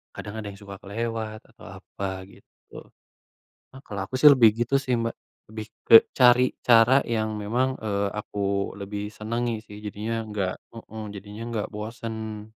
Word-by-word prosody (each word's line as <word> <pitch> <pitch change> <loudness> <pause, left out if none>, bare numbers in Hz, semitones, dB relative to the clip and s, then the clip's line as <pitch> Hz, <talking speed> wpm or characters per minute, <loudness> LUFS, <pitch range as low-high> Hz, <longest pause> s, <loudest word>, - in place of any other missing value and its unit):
kadang 105 - -7
ada 105 - -6
yang 100 -1 -9
suka 100 -1 -9
kelewat, 110 +1 -4
atau 115 +1 -16
apa, 95 -1 -6
gitu. - - -16 0.9
Nah 130 - -12
kalau 100 -3 -5
aku 130 - -12
sih 150 - +10
lebih 115 -4 +7
gitu 120 +4 0
sih 130 - -1
Mbak, 115 0 -2 0.3
lebih 110 0 -7 0.2
ke - - +7 0.2
cari 125 0 +7 0.2
cara 115 +1 +7 0.2
yang 110 0 0
memang, 120 +5 +1 0.2
eee, 100 -1 0
aku 105 - -7 0.4
lebih 100 +1 -5
senangi 115 +2 -2
sih 105 - -11
jadinya 105 +3 -4
nggak 95 -3 -1 0.2
heeh, 110 -1 -9
jadinya 105 +3 -9
nggak 110 -3 -2
bosen. 110 -1 -6
110 Hz, 160 wpm, -25 LUFS, 105-115 Hz, 0.9 s, sih